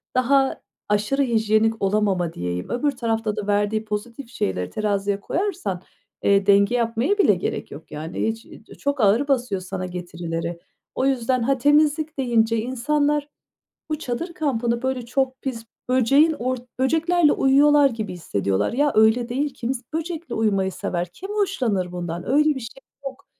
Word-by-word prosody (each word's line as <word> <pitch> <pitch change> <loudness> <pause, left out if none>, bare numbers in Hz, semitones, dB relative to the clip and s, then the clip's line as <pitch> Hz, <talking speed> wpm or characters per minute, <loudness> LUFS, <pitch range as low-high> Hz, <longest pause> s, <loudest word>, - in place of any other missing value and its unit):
daha 270 +1 +2 0.3
aşırı 210 +7 +1
hijyenik 225 -2 +2
olamama 195 -4 +1
diyeyim 90 0 -4
öbür 285 +4 +1
tarafta 225 -4 -2
da 205 - -4
verdiği 205 +1 +1
pozitif 230 +4 -5
şeyleri 95 - -2
teraziye 200 -1 -1
koyarsan, 320 - -2 0.4
eee, 200 -1 +3
denge 200 +4 +5
yapmaya 235 - +1
bile 380 - +5
gerek 175 - -4
yok 145 +3 -11
yani 160 +7 -3
hiç. 225 +1 -4
İii, 220 - -15
di - - -14
çok 285 -3 -1
ağır 220 +8 +3
basıyor 245 -8 0
sana 185 0 -5
getirileri. 170 -1 -5 0.4
O 260 - 0
yüzden 255 -2 +1
ha 270 +2 +2
temizlik 300 +3 +2
deyince 230 -3 +2
insanlar 285 +5 0 0.6
bu 305 - -2
çadır 325 +6 -4
kampını 235 -6 -1
böyle 260 -2 -1
çok 260 +1 -1
pis 230 -4 -4 0.2
böceğin 275 +6 +4
or 255 +1 -1 0.2
böceklerle 320 +3 +3
uyuyorlar 285 +1 +5
gibi 220 -5 -5
hissediyorlar. 100 - -1
Ya 290 +3 +2
öyle 220 +3 +4
değil. 275 +3 -1
Kims 250 0 -3
böcekle 330 +1 -4
uyumayı 195 -4 +1
sever, 180 -3 -3
kim 385 - -9
hoşlanır 245 - 0
bundan? 175 -1 -5
Öyle 300 +1 +4
bir 265 - -4
şey 245 +3 -10 0.2
yok. 275 +1 -7
235 Hz, 155 wpm, -23 LUFS, 200-275 Hz, 0.6 s, denge